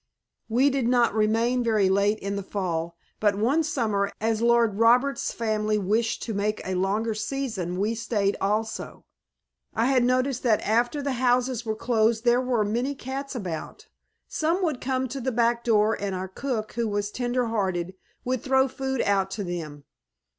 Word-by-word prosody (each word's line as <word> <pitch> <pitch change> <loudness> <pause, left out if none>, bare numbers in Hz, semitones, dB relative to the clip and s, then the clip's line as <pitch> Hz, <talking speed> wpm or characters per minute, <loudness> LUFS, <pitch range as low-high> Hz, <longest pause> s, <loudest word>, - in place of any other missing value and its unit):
We 260 +5 +3
did 265 -3 0
not 240 -2 +3
remain 225 +3 +2
very 215 -4 +2
late 200 +2 +2
in 200 -1 -4
the 200 - -2
fall, 170 -4 -3 0.2
but 205 -2 +2
one 245 +10 +2
summer, 215 -10 0
as 225 0 0
Lord 235 -3 +3
Roberts' 250 +4 +3
family 215 -2 0
wished 215 +3 0
to 225 - -4
make 210 +1 -1
a 190 - -2
longer 200 +5 0
season, 215 -6 -3
we 210 +4 0
stayed 210 -3 0
also. 215 +3 -2 0.7
I 225 +1 +2
had 260 -1 +3
noticed 255 +1 +1
that 225 -4 +2
after 240 +6 +1
the 280 - -1
houses 245 -1 +1
were 220 - 0
closed 225 0 +1
there 240 +1 +4
were 245 -4 +1
many 240 +7 -1
cats 270 +2 -5
about. 180 -9 -6 0.4
Some 335 +4 0
would 310 -7 -1
come 260 0 -1
to 265 +2 -5
the 260 +2 -1
back 235 0 +1
door 220 -1 +3
and 200 -2 -2
our 185 +1 -4
cook, 220 +1 -3
who 235 -1 -1
was 205 0 -2
tender 245 +1 -1
hearted, 190 -5 -1 0.3
would 255 -1 -1
throw 265 0 +3
food 265 -1 -2
out 195 -1 +1
to 205 +1 -4
them. 160 -5 -6
225 Hz, 175 wpm, -26 LUFS, 205-250 Hz, 0.7 s, there